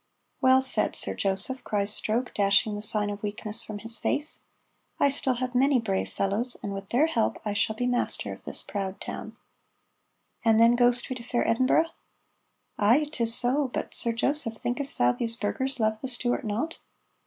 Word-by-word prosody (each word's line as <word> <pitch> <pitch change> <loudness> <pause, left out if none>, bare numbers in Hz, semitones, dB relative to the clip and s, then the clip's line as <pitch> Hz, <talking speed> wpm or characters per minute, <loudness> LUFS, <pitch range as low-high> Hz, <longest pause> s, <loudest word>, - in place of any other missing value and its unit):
"Well 260 0 +5
said, 260 - +7
Sir - - +5
Joseph," 200 +7 -1
cries 205 0 -1
Stroke, 235 +4 -2
dashing 200 +1 +2
the 205 - -5
sign 210 -1 0
of 205 0 -7
weakness 210 +1 -4
from 210 - -7
his 225 +2 -1
face. 300 +2 -1 0.6
"I 285 - +4
still 265 -2 +1
have 255 +1 -4
many 265 +1 +3
brave 195 -4 -2
fellows, 215 +6 -2
and 200 - -4
with 195 0 -8
their 265 +6 +3
help 235 -9 -1
I 210 - -2
shall 205 +1 0
be 245 - -2
master 245 0 -1
of - - -13
this - - -4
proud 195 -1 -5
town." - - -8 1.1
"And 225 -1 +4
then 230 +1 +5
ghost 245 0 +2
we - - -2
to 235 - -10
fair 240 0 -1
Edinburgh?" 260 +7 +2 0.9
"Ay, 245 +9 +3
'tis 230 -5 0
so, 265 +3 +1
but, 245 - -5
Sir 235 - 0
Joseph, 230 0 -1
thinkest 270 +5 0
thou 120 0 +3
these 230 - -1
burghers 260 +4 -3
love 220 -1 0
the 265 - -4
Stuart 245 -1 -2
not?" 235 +11 -3
235 Hz, 185 wpm, -26 LUFS, 210-255 Hz, 1.1 s, said